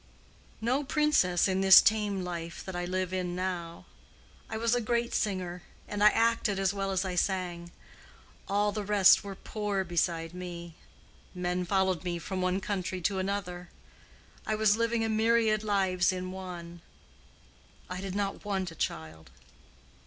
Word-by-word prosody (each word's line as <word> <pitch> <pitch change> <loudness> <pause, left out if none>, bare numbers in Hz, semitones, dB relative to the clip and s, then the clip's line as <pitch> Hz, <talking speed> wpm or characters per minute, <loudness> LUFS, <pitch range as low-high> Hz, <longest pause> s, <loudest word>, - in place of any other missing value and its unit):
"No 255 +6 +1
princess 275 - +2
in 190 0 0
this 190 -1 +10
tame 210 -3 +1
life 170 -1 -6
that 190 - -6
I 175 0 -2
live 185 0 -2
in 180 -1 -2
now. 180 -2 -4 0.6
I 220 - -3
was 230 +1 +1
a 245 - +2
great 235 +1 -1
singer, 180 -3 -2 0.3
and 205 0 -2
I 210 - +9
acted 230 -3 +1
as 195 0 +1
well 195 -1 -2
as 190 0 0
I 185 - -3
sang. 175 -2 -2 0.8
All 205 +1 +1
the 210 0 -3
rest 200 -1 +5
were 200 -1 -7
poor 205 -1 -3
beside 170 -1 -1
me. 175 -2 -7 0.6
Men 180 0 -1
followed 190 -1 +1
me 175 -1 -2
from 185 +2 -4
one 185 +1 +1
country 190 -2 -3
to 190 +3 0
another. 185 -2 -3 0.7
I 215 - -1
was 215 -1 +3
living 230 0 0
a - - 0
myriad 220 -1 +2
lives 190 -3 +2
in 185 0 -4
one. 175 -2 -8 1.1
I 180 +1 -5
did 195 -1 -5
not 200 -1 -2
want 190 -4 -2
a - - -12
child." 80 - -5
190 Hz, 160 wpm, -29 LUFS, 180-210 Hz, 1.1 s, this